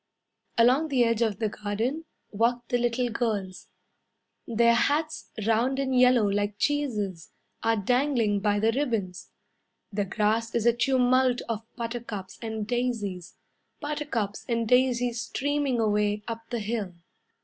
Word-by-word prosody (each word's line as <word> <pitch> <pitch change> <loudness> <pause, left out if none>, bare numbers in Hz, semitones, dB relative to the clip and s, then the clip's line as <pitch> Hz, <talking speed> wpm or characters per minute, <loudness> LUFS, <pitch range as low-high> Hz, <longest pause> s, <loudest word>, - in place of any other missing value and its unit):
Along 255 +7 +4
the 265 -5 +3
edge 230 -1 +1
of 220 -4 +1
the 220 - 0
garden 220 +10 -3 0.3
Walk 235 +3 0
the 245 -2 +1
little 240 0 0
girls. 205 -6 -2 0.8
Their 235 0 +4
hats, 295 +6 0 0.2
round 235 +4 +2
and 265 -1 0
yellow 250 -3 +5
like 205 0 -1
cheeses, 210 - -1 0.3
Are 225 0 +2
dangling 235 -1 +1
by 205 0 +1
the 220 +2 +3
ribbons. 225 -9 -2 0.6
The 205 0 0
grass 220 +4 0
is 235 -1 +1
a 235 - +5
tumult 255 0 +2
of 225 -1 -4
buttercups 230 -5 -6
and 220 -2 -4
daisies; 215 -6 -2 0.4
Buttercups 290 -9 -3
and 230 -1 0
daisies 245 -1 +2
streaming 285 -1 -1
away 210 -1 +1
Up 230 -1 -6
the 235 -2 -2
hill. 210 -4 -3
230 Hz, 135 wpm, -27 LUFS, 210-250 Hz, 0.8 s, yellow